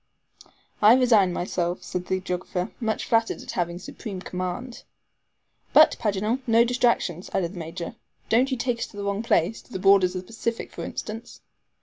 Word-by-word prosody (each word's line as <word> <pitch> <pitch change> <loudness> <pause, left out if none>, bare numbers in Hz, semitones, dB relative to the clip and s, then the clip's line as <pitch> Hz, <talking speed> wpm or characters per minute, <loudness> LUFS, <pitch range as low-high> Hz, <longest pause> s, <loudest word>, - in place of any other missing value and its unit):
"I 215 +3 +8
resign 225 -8 +4
myself," 175 0 -2
said 180 0 -4
the 190 - 0
geographer, 180 0 -3
much 220 -3 -1
flattered 225 0 +1
at - - -6
having 175 -1 -2
supreme 190 +2 -7
command. 185 +7 -5 0.9
"But - - +7
mind, - - -25
Paganel, 210 +4 0
no 230 0 +6
distractions," 235 -8 0
added 175 -1 0
the 180 - -7
Major. 165 +4 -6 0.3
"Don't 250 +4 +3
you 260 - -1
take 235 0 -1
us - - -2
to 205 - -14
the 200 - -4
wrong 200 +1 -1
place 220 -2 +1
to - - -24
the 190 - -3
borders 190 -1 +4
of 185 - -2
the - - -21
Pacific, 230 +1 -4
for - - -7
instance." 225 +2 -7
200 Hz, 185 wpm, -25 LUFS, 180-230 Hz, 0.9 s, I